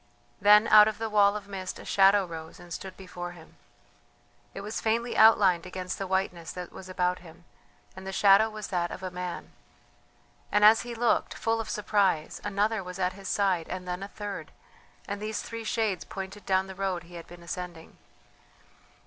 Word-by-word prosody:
Then 210 +2 +7
out 210 0 +9
of 220 - -2
the 225 -1 -4
wall 205 -1 +4
of 205 -1 -6
mist 190 -2 -6
a - - -11
shadow 195 0 +4
rose 160 -2 -9
and 175 -1 -10
stood 190 -1 -7
before 175 -2 -7
him. 165 -2 -16 1.0
It 195 - -5
was 210 +2 -5
faintly 230 +2 0
outlined 195 -6 +5
against 185 0 -5
the 195 - -3
whiteness 185 -3 -2
that 180 -1 -7
was 185 - -11
about 180 -1 0
him, 175 0 -16 0.5
and 190 0 -9
the - - -3
shadow 200 +3 +5
was 215 -1 -7
that 175 -2 -1
of 185 - -8
a 185 - -4
man. 180 -1 -6 1.0
And 210 +1 +4
as 220 +1 +7
he 240 -1 -7
looked, 235 0 +1
full 225 0 0
of 225 - -8
surprise, 200 -6 0
another 205 +1 0
was 180 0 -8
at 185 -1 0
his 195 0 -10
side, 185 -5 +1
and 185 -1 -5
then 180 +1 -3
a 195 - -5
third, 205 -1 -7 0.6
and 200 0 -4
these 215 0 -3
three 230 0 -6
shades 215 -4 -1
pointed 195 0 -8
down 190 -1 +2
the 190 - -8
road 190 -2 -2
he 175 0 -16
had 170 -1 -9
been 175 0 -13
ascending. 175 -1 -7
195 Hz, 190 wpm, -28 LUFS, 180-210 Hz, 1.0 s, out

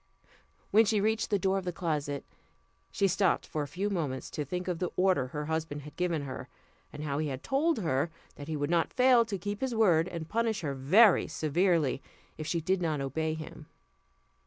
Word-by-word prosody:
When 220 +2 +7
she 215 -1 +1
reached 220 +2 +1
the 205 - +2
door 195 +1 +1
of - - -8
the 180 - -2
closet, 150 -5 -2 0.7
she 195 - +2
stopped 190 0 +1
for 155 - -3
a 145 - -3
few 185 +8 -2
moments 145 -8 -3
to 150 - -3
think 180 +6 -4
of 175 -2 -2
the 180 - -1
order 185 -8 +2
her 150 +3 -5
husband 160 -2 -3
had 150 - -11
given 175 -4 -1
her, 130 -2 -7 0.4
and 150 - -7
how 145 -1 -2
he 155 - -1
had 135 -2 -5
told 310 +5 +1
her 160 -6 0 0.2
that 145 - -10
he 160 -1 -2
would 145 +2 -1
not 170 -1 +2
fail 250 -2 +5
to 210 -3 -3
keep 205 +3 -5
his 260 -3 -1
word 180 -7 +4
and 170 -3 -6
punish 225 0 0
her 145 -4 -2
very 180 - +5
severely, 160 -3 +1 0.3
if 155 - -6
she 170 0 0
did 185 +3 0
not 155 -4 0
obey 155 +4 -2
him. 155 -1 -9
170 Hz, 205 wpm, -30 LUFS, 150-195 Hz, 0.7 s, When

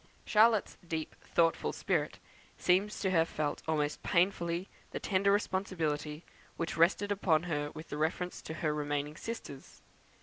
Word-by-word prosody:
Charlotte's 220 0 +4
deep 160 -1 -3
thoughtful 165 -1 +2
spirit - - -1 0.4
appears 195 +4 +2
to 190 - +1
have 165 -2 +3
felt 150 -1 -2
almost 150 -2 0
painfully 170 0 +1 0.2
the - - -4
tender 195 0 +2
responsibility 165 -6 -1 0.3
which 165 - -2
rested 185 +5 +3
upon 175 -6 +2
her 145 -4 -1
with 155 +1 -8
reference 160 +4 -1
to 160 - -6
her 155 -1 0
remaining 145 0 -2
sisters. 155 -10 -8
165 Hz, 135 wpm, -32 LUFS, 150-190 Hz, 0.4 s, Charlotte's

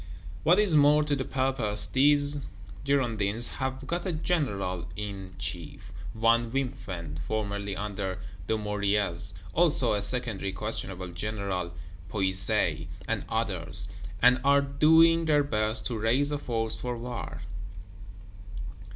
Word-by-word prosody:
What 175 +3 +5
is 210 -5 +2
more 150 +1 +6
to 150 -1 0
the 135 - -2
purpose, 130 -7 0
these 145 +1 +3 0.4
Girondins 120 -5 0
have 130 0 -3
got 170 +5 -2
a 185 - -1
General 105 - -1
in 95 -3 -6
chief, 95 0 -5 0.2
one 115 +1 +3
Wimpfen, 95 - -4
formerly 100 -2 -2
under 100 -2 -3 0.3
Dumouriez; 100 -3 -1 0.2
also 155 -8 +4
a 105 - 0
secondary 100 -3 -2
questionable 95 -3 -3
General 95 -1 -3 0.4
Puisaye, 95 -1 +1 0.2
and - - -2
others; - - +2 0.3
and 125 +1 +6
are 140 0 +5
doing 160 +4 +5
their 150 -2 +4
best 110 -4 -1
to 115 -3 -2
raise 130 +7 +2
a 145 - -1
force 115 -4 0
for 125 -1 -4
war. 120 -5 -6
115 Hz, 120 wpm, -28 LUFS, 100-140 Hz, 0.4 s, more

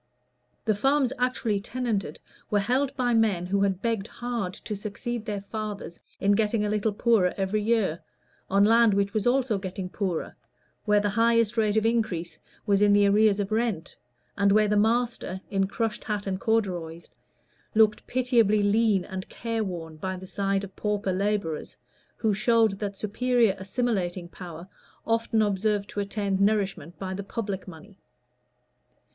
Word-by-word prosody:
The 220 - +3
farms 270 +4 +2
actually 250 -4 0
tenanted 220 -7 -3 0.3
were 210 - +2
held 255 +7 +1
by 245 -2 +1
men 215 -6 +2
who 195 +2 0
had 195 -1 0
begged 225 -3 -1
hard 240 -6 -4
to 210 - -6
succeed 215 +3 -4
their 205 -2 -3
fathers 210 -3 -6 0.2
in 200 - +2
getting 210 +1 +2
a 210 - -1
little 215 +1 +1
poorer 205 -3 +2
every 195 +2 0
year, 210 -7 +1 0.5
on 200 +1 +4
land 225 -1 +5
which 200 0 0
was 215 +1 0
also 245 -4 +2
getting 190 -1 -5
poorer, 185 -4 -3 0.5
where 210 -1 +4
the 205 0 0
highest 230 +1 +3
rate 215 -2 +2
of 220 - +2
increase 200 -8 -1 0.3
was 200 -2 +2
in 205 -1 +5
the 205 0 +5
arrears 210 0 +4
of 200 +1 -2
rent, 215 -7 -1 0.4
and 200 -1 +3
where 215 +1 +4
the 210 - +1
master, 225 -3 +1
in 195 -1 +1
crushed 225 +2 -2
hat 210 -2 -2
and 190 -1 -2
corduroys, 175 -7 -1 0.7
looked 215 -1 +3
pitiably 235 -5 +2
lean 205 -2 +3
and 190 -1 -6
care 230 -1 -3
worn 165 -5 -6
by 185 +3 -4
the 185 - -9
side 195 +1 -1
of 195 -1 -9
pauper 205 -2 -1
laborers, 195 -5 -2 0.4
who 220 -2 +1
showed 220 -1 +2
that 200 -2 -4
superior 230 0 +1
assimilating 190 -4 -2
power 170 -1 -9 0.4
often 225 -1 +1
observed 205 0 0
to 205 - -5
attend 200 -1 -1
nourishment 195 -5 0
by 190 -1 -4
the 200 +1 -5
public 200 -2 -4
money. 185 +3 -12
205 Hz, 160 wpm, -26 LUFS, 195-225 Hz, 0.7 s, land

